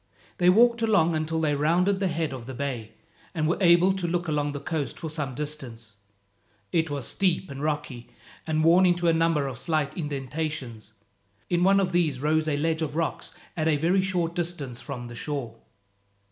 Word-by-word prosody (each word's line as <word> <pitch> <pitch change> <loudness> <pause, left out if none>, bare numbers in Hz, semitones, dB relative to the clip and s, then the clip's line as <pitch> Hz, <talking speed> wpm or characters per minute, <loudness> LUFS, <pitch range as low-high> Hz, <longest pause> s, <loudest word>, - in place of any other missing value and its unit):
They 180 0 +5
walked 235 +4 +5
along 200 -7 +3
until 160 +1 -1
they 155 -2 +1
rounded 175 +7 +2
the 195 - +1
head 160 -4 -2
of 125 -2 -8
the 130 - -6
bay, 125 -5 -4 0.4
and 155 -2 +1
were 165 - 0
able 175 +1 +5
to 190 -2 -2
look 175 0 -1
along 145 -1 0
the 145 - -5
coast 150 -1 -3
for 160 - -5
some 145 -5 -3
distance. 120 -7 -6 0.7
It 165 -1 +1
was 140 -4 -4
steep 185 -3 0
and 135 0 -7
rocky, 150 -5 -3 0.4
and 155 0 +1
worn 175 +3 +6
into 175 -1 +2
a 165 - +5
number 165 -3 +2
of 130 -4 -5
slight 155 -1 -1
indentations. 140 - -4 0.6
In 175 0 +2
one 195 +1 +5
of 185 -2 0
these 165 -7 +1
rose 155 +2 +1
a 145 -2 +1
ledge 160 +2 0
of 150 -2 -3
rocks 165 0 -2 0.2
at 160 -2 0
a 155 -2 +3
very 175 +6 +2
short 180 -3 -1
distance 165 -8 -4
from 130 -4 -6
the 120 - -9
shore. 120 -2 -5
155 Hz, 190 wpm, -26 LUFS, 140-175 Hz, 0.7 s, worn